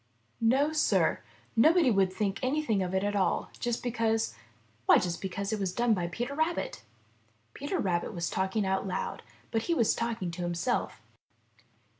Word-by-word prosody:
No, 270 +7 +3
Sir, 305 - +2 0.3
nobody 310 +4 +5
would 195 -3 +3
think 195 0 -1
anything 255 -6 +1
of 185 0 -2
it 190 - +1
at 205 0 0
all 195 -2 0
just 240 -1 -2
because 225 - 0 0.3
— 110 0 -36
why - - +8
just 175 -1 -2
because 200 +2 -3
it 215 - -1
was 190 -2 -1
done 240 +1 +2
by 175 -4 -1
Peter 240 +10 -4
Rabbit." 315 - -1 0.7
Peter 290 +6 -3
was 175 -1 -1
talking 190 +2 0
out 190 +1 0
loud, 185 - -3 0.3
but 225 - +1
he 340 - +3
was 230 -8 +3
talking 230 -6 -2
to 175 +2 -6
himself. 175 +7 -1
210 Hz, 165 wpm, -29 LUFS, 185-245 Hz, 0.7 s, why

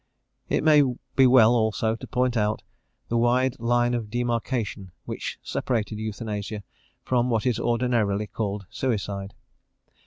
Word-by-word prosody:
It - - +1
may 150 -1 +6 0.3
be 135 -1 +6
well, 120 -2 +6
also, 110 -1 +1
to 115 - -9
point 125 -1 0
out 105 -1 0 0.5
the 115 - +1
wide 125 +2 +2
line 120 +1 +2
of 115 -3 -2
demarcation 115 -4 -2 0.2
which - - -5
separated 110 -3 -2
euthanasia 105 -1 -4 0.4
from 125 -1 +1
what 115 -1 0
is 120 -3 +1
ordinarily 115 -4 +1
called 105 -2 -4
suicide. 100 -5 -3
115 Hz, 130 wpm, -25 LUFS, 105-125 Hz, 0.5 s, may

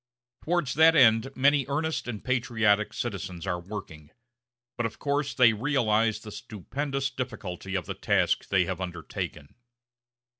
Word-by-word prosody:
Towards 170 -6 0
that 160 +2 +6
end 115 -3 +5
many 140 0 +3
earnest 155 +1 -1
and 110 -4 -5
patriotic 115 -5 +2
citizens 95 -6 -5
are 90 -2 -1
working; 85 -5 -8 0.7
but 120 - 0
of 110 - -12
course 145 -1 -1
they 120 -3 +6
realize 110 -3 +1
the 105 - -9
stupendous 135 - -4
difficulty 100 -7 -5
of 90 -4 -1
the - - -4
task - - +1
they 95 -2 +3
have 95 +1 -4
undertaken. 85 -4 -6
115 Hz, 140 wpm, -27 LUFS, 95-135 Hz, 0.7 s, that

